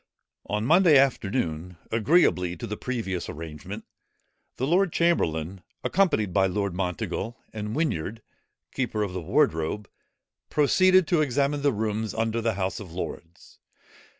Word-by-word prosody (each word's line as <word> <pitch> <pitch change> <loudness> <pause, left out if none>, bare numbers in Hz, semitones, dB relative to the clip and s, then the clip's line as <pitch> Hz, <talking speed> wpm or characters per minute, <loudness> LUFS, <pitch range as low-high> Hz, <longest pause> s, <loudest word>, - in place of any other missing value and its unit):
On 105 +1 -1
Monday 165 +1 +6
afternoon, 95 - 0
agreeably 110 - +3
to - - -5
the 105 - -4
previous 110 -8 -3
arrangement, 75 -1 -7 0.7
the 130 - 0
lord 180 +4 +3
chamberlain, 95 - 0 0.2
accompanied 140 - +1
by 95 0 +4
Lord 100 0 -1
Monteagle, 90 +5 -3 0.2
and 105 +1 -4
Whinyard, 115 - -2 0.5
keeper 120 -5 -1
of 95 -3 -4
the 90 - -3
wardrobe, 80 +5 +1 0.6
proceeded 185 +4 +4
to 170 -4 +3
examine 140 +1 +1
the 145 0 +3
rooms 110 -1 -2
under 115 +1 0
the 115 -2 0
House 95 -1 -2
of 95 -6 -9
Lords. 85 -1 -8
110 Hz, 130 wpm, -26 LUFS, 90-140 Hz, 0.7 s, Monday